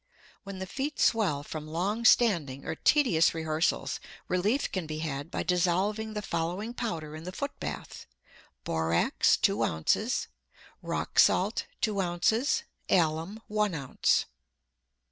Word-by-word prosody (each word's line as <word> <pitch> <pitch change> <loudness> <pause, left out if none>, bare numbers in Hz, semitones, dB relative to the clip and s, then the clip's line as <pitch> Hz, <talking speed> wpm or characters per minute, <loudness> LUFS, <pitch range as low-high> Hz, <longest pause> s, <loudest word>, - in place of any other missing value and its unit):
When 195 -2 -8
the 190 - -4
feet 275 +9 -4
swell 185 -11 +2
from 155 +1 -7
long 195 +9 -2
standing 165 - +3
or 160 - -2
tedious 175 - +3
rehearsals, 160 0 0 0.3
relief 205 +10 +1
can 185 -4 -3
be 155 0 -4
had 150 -1 -4
by - - -3
dissolving 190 +5 0
the 210 - -3
following 180 +7 -2
powder 165 -11 -4
in 155 - -8
the 180 - -6
foot 280 +9 -5
bath: - - -6 0.6
Borax, 80 +1 +2
two - - +1
ounces; 80 0 0 0.5
rock - - -2
salt, 200 +5 +3
two 205 -3 +1
ounces; 220 - +1 0.3
alum, 170 +5 +1
one 210 -3 0
ounce. 135 -4 +1
180 Hz, 130 wpm, -29 LUFS, 160-215 Hz, 0.6 s, standing